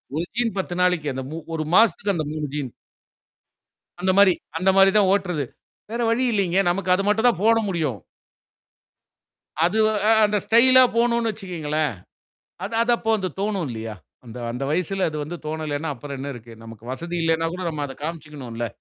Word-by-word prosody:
ஒரு 160 - 0
ஜீன் 230 -4 0
10 185 -2 -2
நாளைக்கு. 180 -4 +2
அந்த 130 0 -4
மு 160 - -5 0.2
ஒரு 160 -1 -1
மாசத்துக்கு 210 -2 +4
அந்த 155 -2 -2
3 155 -1 -3
ஜீன். 145 -3 -3 1.3
அந்த 185 +1 +1
மாரி 200 -3 +7 0.2
அந்த 185 +3 +3
மாரி 195 0 +7
தான் 200 -2 +4
ஓட்டுறது. 180 -7 0 0.5
வேற 235 - -2
வழி 250 +3 +1
இல்லைங்க. 190 -4 +1
நமக்கு 185 0 0
அது 195 - -1
மட்டும் 220 +4 +4
தான் 190 -7 0
போட 225 +1 +5
முடியும். 155 - -2 1.6
அது 180 +6 +1 0.3
அ - - +6
அந்த 210 0 +1
ஸ்டைலா 255 +3 +6
போணும்னு 235 -1 +2
வச்சுக்கோங்களேன், 155 - -2 0.7
அது 220 +3 -5
அதப்போ 235 -1 +1
அந்த 190 -2 -2
தோணும் 200 -4 -1
இல்லையா? 110 -1 -6 0.3
அந்த 120 +1 -10
அந்த 125 +3 -4
வயசுல, 185 +4 0
அது 155 - -6
வந்து 175 +4 -6
தோணலைன்னா, 155 0 -3
அப்புறம் 140 +2 -7
என்ன 140 +2 -5
இருக்கு? 120 -1 -12
நமக்கு 115 -1 -12
வசதி 170 +6 -5
இல்லைன்னா 165 0 +1
கூட 185 - -5
நம்ம 150 -2 -3
அத 135 - -9
காமிச்சுக்கணும்ல! 150 -8 -5
175 Hz, 170 wpm, -23 LUFS, 150-200 Hz, 1.6 s, மாரி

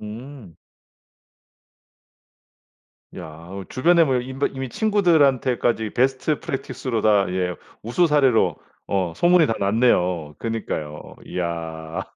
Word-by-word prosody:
음. 115 - -10 2.6
야 - - -7 0.2
어 95 0 -7
주변에 170 +6 +4
뭐 130 -4 +1
임 130 +2 -8
버 140 - +2
이미 135 -1 -5
친구들한테까지 135 - +2
베스트 135 +5 0
프랙티스로 130 -3 -4
다 105 -2 +4
예 90 -1 -2 0.3
우수 120 +11 +2
사례로 135 -7 +3 0.3
어 95 -4 -1
소문이 175 -2 +4
다 115 - +1
났네요. 90 -7 +1
그니까요. 80 -10 -5
이야. 80 -2 -4
115 Hz, 230 characters per minute, -22 LUFS, 95-135 Hz, 2.6 s, 주변에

